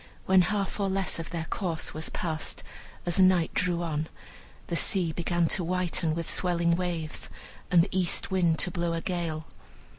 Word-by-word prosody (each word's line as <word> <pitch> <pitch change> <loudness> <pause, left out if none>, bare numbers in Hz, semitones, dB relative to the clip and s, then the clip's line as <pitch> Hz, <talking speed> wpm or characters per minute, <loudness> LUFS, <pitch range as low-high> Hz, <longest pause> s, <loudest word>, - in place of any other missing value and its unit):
When 190 0 +6
half 200 +1 -1
or 200 -1 +1
less 190 -2 0
of 165 - -5
their 165 -1 -3
course 170 -5 -2
was 155 +1 -3
passed, 160 -3 -3 0.4
as 175 +1 +1
night 185 -3 +5
drew 175 -2 +1
on, 155 -1 -2 0.6
the 170 - -3
sea 175 -1 +2
began 175 +1 +1
to 185 - +1
whiten 175 -2 0
with 165 -1 -3
swelling 170 -2 +2
waves, 170 -3 -3 0.4
and 175 -2 +6
the 195 - -3
east 185 0 0
wind 175 -4 +3
to 180 - -4
blow 170 -1 -1
a 165 - -2
gale. 165 -4 -2
175 Hz, 175 wpm, -28 LUFS, 165-185 Hz, 0.6 s, When